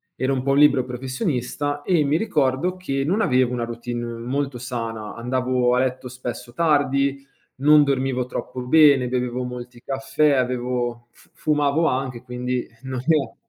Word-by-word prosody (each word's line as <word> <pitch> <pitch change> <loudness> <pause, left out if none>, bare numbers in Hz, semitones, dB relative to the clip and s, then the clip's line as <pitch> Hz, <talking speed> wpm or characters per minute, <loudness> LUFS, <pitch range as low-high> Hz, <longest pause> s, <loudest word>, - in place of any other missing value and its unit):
ero 130 +1 -1
un 130 - -1
po' 135 - 0
un 140 - +3
libero 140 -4 +5
professionista 130 +3 -3
e 160 -3 +2
mi 145 +2 +1
ricordo 165 -2 0
che 135 -7 -2
non 180 +9 +1
avevo 130 - +2
una 120 -1 -2
routine 120 +1 -5
molto 125 +3 -3
sana, 115 -4 -5
andavo 125 +1 +1
a 125 - +2
letto 130 0 -1
spesso 125 -1 -7
tardi, 140 -2 +1 0.3
non 150 +2 +6
dormivo 130 -2 0
troppo 125 0 -5
bene, 135 -1 +5
bevevo 125 0 -1
molti 125 -1 -8
caffè, 135 +3 +1
avevo 125 -2 -1
fu - - -24
fumavo 150 +1 +1
anche, 130 -2 -2
quindi 125 0 -3 0.2
non 130 -2 -4
eh. 155 -3 +2
130 Hz, 155 wpm, -23 LUFS, 125-140 Hz, 0.3 s, non